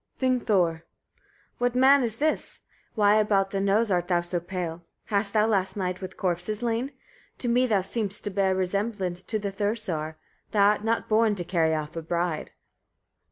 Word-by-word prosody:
Vingthor. 210 -10 +2
2. - - -27 0.8
What 245 0 +1
man 270 +2 +6
is 230 -3 -1
this? 305 +5 -1 0.3
Why 210 -1 +4
about 200 -2 +2
the 195 - -1
nose 200 +2 +2
art 175 -1 +1
thou 175 -1 +2
so 175 0 -3
pale? 175 -1 -5 0.2
Hast 200 -1 -1
thou 215 -1 +4
last 200 -3 0
night 185 -1 -2
with 185 0 -7
corpses 185 +5 -2
lain? 240 +3 -1 0.5
To 245 - -4
me 250 +2 +3
thou 205 -5 +2
seemst 205 0 +1
to 205 - -3
bear 190 -1 +1
resemblance 190 -1 -2
to 220 - -3
the 200 -1 -3
Thursar. 195 -7 -3 0.3
Thou 200 -1 +4
art 210 0 0
not 225 +1 0
born 215 -1 +3
to 180 - -3
carry 165 -2 +1
off 155 0 -5
a 165 - -3
bride. 170 -1 -2
200 Hz, 180 wpm, -26 LUFS, 180-220 Hz, 0.8 s, man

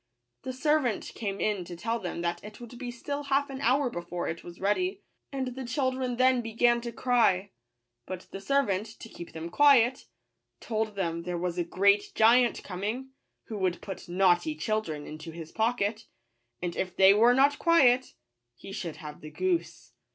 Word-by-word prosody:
The 260 - -4
ser 300 +4 +2
vant 245 -8 -2
came 200 -3 -4
in 205 -4 0
to 175 - -8
tell 230 +7 -2
them 180 -4 -4
that 170 0 -2
it 210 0 -10
would 240 0 -10
be 250 -2 -5
still 285 +4 -5
half 280 +1 +1
an 270 0 -6
hour 270 +2 +3
before 175 -1 -4
it 165 - -5
was 175 0 -11
ready; 365 - 0 0.3
and 265 -2 -2
the 260 +1 -6
children 255 -1 -1
then 255 -1 +4
began 235 +1 +2
to 235 0 -5
cry: 225 -6 +2 0.6
but 185 -1 -5
the 195 - -7
ser 275 +7 +2
vant, 200 -2 -2
to 225 +1 -11
keep 170 - -10
them 165 +1 -6
quiet, 260 -1 +5 0.5
told 220 -2 -2
them 170 -4 -2
there 175 +1 -4
was 175 0 -2
a - - +2
great 200 +4 +2
giant 235 +2 +4
coming, 215 +8 -4 0.3
who 215 -2 -6
would 185 -2 0
put 195 -3 -8
naughty 185 - +3
children 215 - -2
into 155 +2 -8
his 165 -1 -9
pocket, 220 -1 -1 0.6
and 175 -1 -2
if 185 - -3
they 190 +1 +7
were 235 +4 +5
not 280 +2 +4
quiet, 260 -7 +4 0.4
he 195 - -11
should 170 -5 -5
have 150 -1 -9
the 155 - -8
goose. 360 - -2
220 Hz, 185 wpm, -28 LUFS, 180-255 Hz, 0.6 s, they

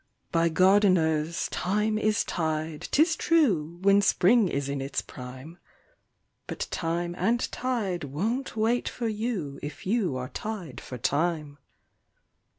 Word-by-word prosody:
By 170 -1 +3
gardeners 170 -4 +3
thyme 210 +3 0
is 215 0 +2
tied, 155 -2 -3
'tis 325 +3 +3
true, 195 - +2
when 200 +1 +5
spring 200 +3 +4
is 140 -4 -2
in 140 -1 -3
its 135 +1 -2
prime; 130 +6 -9 0.9
But - - -4
time 170 +1 -2
and 230 +6 +2
tide 210 - -2
won't 220 - -2
wait 230 +3 +1
for 235 - -3
you 210 - -3
if 145 - -7
you 190 - 0
are 125 0 -5
tied 190 - -6
for 125 - -7
time. 150 +2 -1
175 Hz, 130 wpm, -27 LUFS, 150-215 Hz, 0.9 s, when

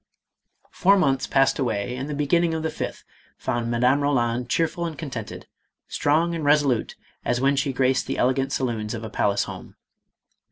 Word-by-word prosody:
Four 200 +2 +4
months 135 -7 +1
passed 135 +1 +2
away 120 -2 -1
and 135 +3 -5
the 150 - -3
beginning 165 +3 +1
of 160 - -3
the 160 - -1
fifth, - - -5 0.3
found 120 -1 -2
Madame 125 +4 +2
Roland 125 -4 0
cheerful 165 +3 0
and 160 -3 -7
contented, 125 -9 -6 0.4
strong 160 +4 +1
and 165 -2 -3
resolute 145 -5 +2 0.3
as 120 0 0
when 140 +2 +2
she 140 0 0
graced 130 0 +1
the - - -2
elegant 130 +2 +1
saloons 115 -4 -2
of 115 - -6
a 110 - -6
palace 100 -1 +1
home. - - -9
135 Hz, 170 wpm, -24 LUFS, 120-150 Hz, 0.4 s, Four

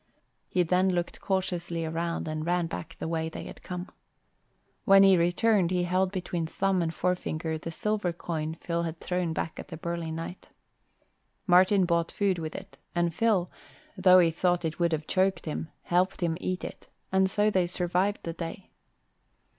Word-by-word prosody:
He 180 - +2
then 180 +3 +2
looked 175 -2 -2
cautiously 175 -3 -1
around 165 +1 -2
and 155 0 -3
ran 175 +1 +1
back 165 0 -6
the - - -4
way 160 -1 -1
they - - -7
had - - -10
come. 180 +1 -5 1.0
When 195 0 +7
he 195 -1 +7
returned 180 +2 +3
he 180 -1 +1
held 185 +1 +1
between 175 -3 -3
thumb 190 +2 +1
and 165 -1 0
forefinger 165 -3 -2
the 165 - -6
silver 205 +2 -1
coin 160 -2 -4
Phil 170 0 -2
had 165 -1 -4
thrown 180 -2 -1
back 160 0 -3
at - - -7
the 165 - -7
burly 170 0 -3
knight. 165 +3 -6 1.0
Martin 185 +1 +5
bought 170 -1 +1
food 195 -3 +1
with 155 -1 -5
it - - -9 0.2
and 170 -1 +1
Phil, 200 -4 +1 0.4
though 185 -1 +6
he 170 -2 +5
thought 175 +1 +1
it 160 +1 -3
would 170 -1 +2
have 155 -1 -1
choked 190 0 +1
him, 155 +1 -4
helped 180 +2 +1
him 170 -2 +1
eat 185 0 -2
it; - - -8 0.2
and 190 0 +3
so 210 +2 +2
they 185 -3 +2
survived 180 +3 0
the 165 - -4
day. 170 +3 -7
175 Hz, 180 wpm, -28 LUFS, 165-185 Hz, 1.0 s, When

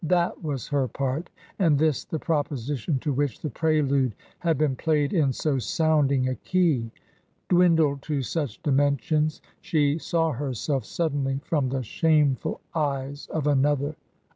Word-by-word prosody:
That 175 +2 +1
was 140 -5 -3
her 140 -3 +1
part, 140 +6 -3 0.3
and 165 -7 +4
this 155 -1 +1
the 160 - -3
proposition 145 -3 -1
to 145 - -1
which 140 -3 -1
the 150 - -3
prelude 140 -6 +1 0.2
had 165 -2 +1
been 145 -3 +1
played 150 +2 +1
in 150 -7 +3
so 135 +1 0
sounding 140 -2 +2
a 130 - 0
key. 155 -7 +1 0.6
Dwindled 165 -6 +4
to 145 -3 0
such 145 -4 -3
dimensions, 145 +2 +1 0.2
she 150 -1 +1
saw 165 0 0
herself 135 -1 -2
sud 160 +4 -1
denly 135 -1 -1
from 145 -5 0
the 130 0 -2
shameful 150 +1 +1
eyes 140 -2 -2
of 160 -3 -2
another. 145 +1 +2
145 Hz, 145 wpm, -25 LUFS, 135-160 Hz, 0.6 s, and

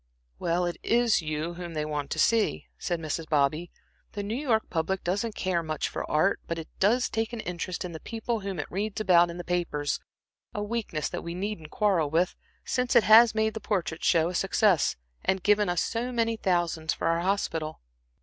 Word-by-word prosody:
"Well, 175 +1 +1
it 175 - -3
is 235 -4 +3
you 155 +2 -3
whom 170 -1 -7
they 150 0 -1
want 150 -2 -3
to - - -3
see," 225 +7 +2
said 175 -2 -2
Mrs. 160 0 -4
Bobby. 155 +3 +1 0.4
"The 205 - -3
New 205 +2 -3
York 240 -4 +1
public 180 +3 -1
doesn't 205 +5 -1
care 185 -3 0
much 155 -2 -2
for - - -5
art, 155 +6 +2
but 170 - -2
it 165 -1 -6
does 235 +6 +3
take 225 +1 -2
an 235 - -4
interest 180 0 -4
in 180 - -5
the 160 - -7
people 230 +3 -3
whom 195 -2 -5
it 145 - -2
reads 205 +3 -2
about 175 -4 +5
in 170 - -6
the 175 - -5
papers 170 -5 -1 0.6
a 205 - -1
weakness 210 -9 -2
that - - -4
we 170 0 -6
needn't 185 -4 -4
quarrel 185 -8 +1
with, 170 +4 +1 0.3
since 250 -1 0
it - - +7
has 220 +1 +7
made 220 0 +1
the 220 - -4
Portrait 170 -6 -2
Show 165 -1 +3
a - - -5
success, 190 -2 +2 0.3
and 190 -1 0
given 210 -1 +3
us 175 -1 +1
so 235 +2 -2
many 230 -1 +1
thousands 175 -5 0
for - - -4
our 165 0 +2
hospital." 170 -4 -1
180 Hz, 205 wpm, -27 LUFS, 165-215 Hz, 0.6 s, it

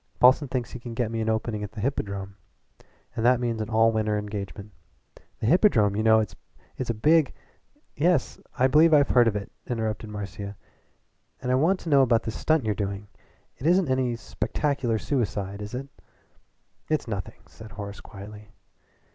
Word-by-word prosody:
Paulson 130 +4 +6
thinks 125 -2 -3
he 125 - -7
can 120 -1 -8
get 115 -2 -1
me 115 -1 -2
an 110 - -1
opening 110 -1 -1
at 105 +1 -7
the 110 - -8
Hippodrome, 100 -5 -3 0.8
and 110 - -2
that 125 0 +5
means 115 -2 -1
an 110 - -4
all 115 0 +4
winter 110 -1 0
engagement. 105 0 -6 0.7
The - - -3
Hippodrome 115 - +4
you 110 - 0
know, 110 0 +5 0.5
is 130 - -4
a 115 - 0
big 155 +6 +4 0.3
" - - -44 0.3
"Yes, 165 -2 +1 0.2
I 130 - +4
believe 155 +4 +6
I've 145 -1 +4
heard 120 -2 +5
of 110 - +1
it," 100 -1 -4 0.2
interrupted 110 -2 -3
Marcia, 100 -1 -6 0.8
"but 125 -1 -2
I - - +3
want 165 +9 +3
to 165 - -6
know 140 -2 +6
about 115 -4 +3
this 110 - -4
stunt 155 -1 +1
you're 105 - +1
doing. 100 0 -4 0.5
It 140 - -2
isn't 180 -2 +3
any 130 -2 +1
spectacular 120 +2 -1
suicide, 105 -6 -2
is 105 +3 -6
it?" 135 +2 -5 1.0
"It's 155 -5 0
nothing," 100 -5 -5
said 110 -3 -13
Horace 100 0 -7
quietly. 105 0 -11
115 Hz, 180 wpm, -26 LUFS, 105-130 Hz, 1.0 s, Paulson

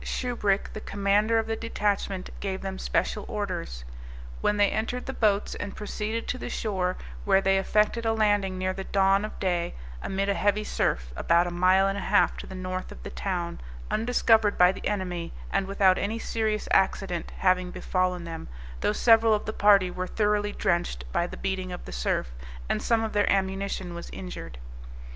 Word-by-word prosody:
Shubrick, 210 -6 -1
the 215 - -6
commander 205 +3 +2
of 225 - +1
the 225 0 -2
detachment, 205 -4 -2
gave 190 -1 -3
them 190 -1 -4
special 210 - 0
orders; 175 - -4 0.6
when 210 - +2
they 205 -1 +4
entered 230 +3 -2
the 265 - -4
boats 210 -4 +1
and 200 - -6
proceeded 215 +2 -3
to 255 - -2
the - - -5
shore, 185 -4 -1 0.3
where 195 - +4
they 195 0 +3
effected 210 +4 +1
a 225 - +2
landing 205 -4 +2
near 185 0 -1
the 195 - -5
dawn 195 +1 +3
of 215 - -6
day, 175 -2 -1 0.3
amid 195 +1 -1
a 200 - +2
heavy 205 +1 +1
surf, - - -1
about 170 - +3
a 175 - -3
mile 185 +2 +4
and 195 +1 -1
a - - -5
half 205 +2 +3
to - - -7
the 190 - -8
north 185 0 -4
of - - -11
the - - -7
town, 175 -3 -3 0.3
undiscovered 225 -2 +3
by 180 0 +7
the 190 - -5
enemy, 180 -4 -3 0.2
and 195 -1 0
without 195 -1 +3
any 215 +3 -1
serious 220 -2 -1
accident 190 -2 +1
having 185 -1 +2
befallen 180 -1 -1
them, 165 -1 -7 0.3
though - - +1
several 225 0 +5
of 210 - -4
the 215 - -3
party 200 -3 +5
were 185 +1 -4
thoroughly 205 0 +1
drenched 170 - -1
by 175 - +1
the - - -9
beating 190 -1 -3
of 180 - -7
the - - -8
surf, - - -1 0.4
and - - 0
some 230 -1 +2
of 220 - -3
their 205 -1 +3
ammunition 195 -2 -1
was 170 0 -7
injured. 180 - -8
195 Hz, 190 wpm, -27 LUFS, 185-210 Hz, 0.6 s, by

